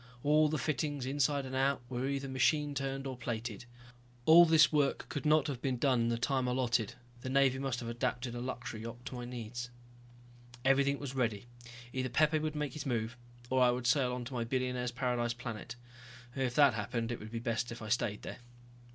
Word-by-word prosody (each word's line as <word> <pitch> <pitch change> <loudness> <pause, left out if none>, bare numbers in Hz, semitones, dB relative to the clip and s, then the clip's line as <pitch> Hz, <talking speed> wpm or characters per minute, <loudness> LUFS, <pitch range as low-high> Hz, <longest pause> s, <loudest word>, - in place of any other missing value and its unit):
All 150 +1 +4
the 155 - 0
fittings, 145 -2 -1
inside 140 +1 +1
and 130 - -7
out, 135 -1 +1
were 125 +1 -2
either 140 0 -2
machine 145 +3 +2
turned 135 0 -3
or 130 -1 -4
plated. 115 -2 -4 0.6
All 170 +2 +9
this 160 -1 +6
work 145 -2 +1
could 145 +1 -2
not 155 -1 +5
have 135 -5 -4
been 130 -2 0
done 130 -1 +2
in 115 - +1
the 115 - 0
time 130 +1 0
allotted, 120 -2 0 0.3
the 130 - -4
Navy 135 -1 +3
must 135 -2 -2
have 120 - -5
adapted 120 +1 -2
a 120 - -4
luxury 120 -3 -5
yacht 115 +2 -8
to - - -6
my 125 -1 -5
needs. 120 0 -6 1.0
Everything 140 +1 +4
was 140 -2 -6
ready. 115 -5 -1 0.5
Either 130 0 -1
Pepe 155 +5 +3
would 155 0 -2
make 150 -3 -2
his 150 - -5
move 115 -1 -1 0.4
or 130 0 +3
I 125 - +6
would 125 0 -1
sail 125 0 +3
on 125 -1 -4
to 130 - -7
my 120 -2 -1
billionaire's 125 0 -1
paradise 120 -1 0
planet. 120 -1 -6 0.6
If 130 -2 -1
that 140 -4 +6
happened, 115 +2 -2
it 120 - -4
would 110 - -8
be 115 - -3
best 115 +1 -2
if 120 - -7
I 110 - -7
stayed 110 -3 0
there. - - -6
125 Hz, 205 wpm, -33 LUFS, 120-140 Hz, 1.0 s, All